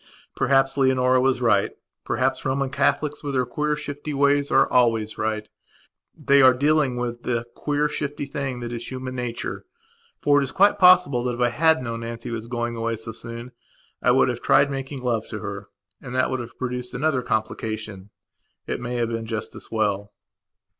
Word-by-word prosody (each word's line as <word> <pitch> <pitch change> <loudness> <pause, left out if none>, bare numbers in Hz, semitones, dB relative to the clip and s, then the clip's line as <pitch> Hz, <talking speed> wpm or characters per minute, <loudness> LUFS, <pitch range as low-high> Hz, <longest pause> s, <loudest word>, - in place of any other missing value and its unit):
Perhaps 135 +1 +2
Leonora 130 -1 +3
was 130 -1 +1
right; 105 -4 +3 0.3
perhaps 130 +1 0
Roman 135 0 -1
Catholics, 150 +2 0
with 140 -2 -3
their 130 -1 +2
queer, 150 +5 -1
shifty 145 0 -5
ways, 140 0 +3
are - - +4
always 115 -3 +2
right. 110 0 -2 0.7
They 140 0 +4
are 130 -1 +7
dealing 145 -1 +2
with 120 -1 -3
the 120 -1 -2
queer, 150 0 0
shifty 145 -1 -4
thing 135 -3 -4
that 120 0 -5
is 120 0 -5
human 130 0 -5
nature. 125 -2 -4 0.6
For 145 0 +4
it - - +1
is 130 - -3
quite 200 +2 +4
possible 180 -9 +6
that, 125 -1 -1
if - - -10
I 120 0 +3
had 160 +3 +3
known 115 -2 -4
Nancy 115 0 -6
was 115 -1 -5
going 120 -1 -3
away 115 0 -1
so 115 +1 -7
soon, 115 +2 -8 0.5
I - - +4
should - - +4
have - - -3
tried 140 0 +4
making 135 0 -5
love 115 -3 -1
to 110 - -6
her. 100 0 -6 0.3
And 125 - -7
that 130 - +2
would 130 - -1
have 120 -1 -8
produced 125 -1 -4
another 135 0 +1
complication. 110 -3 -3 0.6
It - - -3
may 120 0 -4
have 120 -1 0
been 115 -1 -4
just 110 -1 -4
as - - -9
well. 105 -2 -1
125 Hz, 190 wpm, -24 LUFS, 115-140 Hz, 0.7 s, are